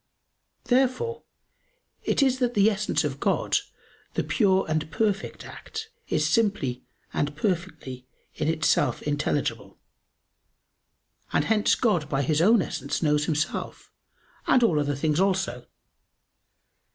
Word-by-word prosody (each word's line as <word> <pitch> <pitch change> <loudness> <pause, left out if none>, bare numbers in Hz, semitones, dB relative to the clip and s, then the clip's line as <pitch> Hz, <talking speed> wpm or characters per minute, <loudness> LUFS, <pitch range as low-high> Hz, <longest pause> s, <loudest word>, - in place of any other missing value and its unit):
Therefore 260 - +1 0.8
it - - +1
is 260 -1 +2
that 245 -2 0
the 205 +2 +5
Essence 210 0 0
of - - -3
God, - - +1 0.6
the - - +1
pure 190 -4 +2
and 155 0 -1
perfect 205 +2 -1
act, 445 0 -8 0.2
is - - +1
simply 200 - +1 0.3
and 145 0 -1
perfectly 160 - -3 0.3
in 150 - -2
itself 160 0 +1
intelligible; 145 -1 -2 1.5
and - - +1
hence 215 -2 +3
God 180 -11 +1
by 140 -2 0
His 150 +3 +1
own 215 +3 +5
Essence 145 -1 -3
knows 150 -1 +2
Himself, 150 -1 -3 0.6
and 255 - +4
all 170 -10 +3
other 145 -1 0
things 150 +3 0
also. 185 -11 0
175 Hz, 120 wpm, -26 LUFS, 150-220 Hz, 1.5 s, the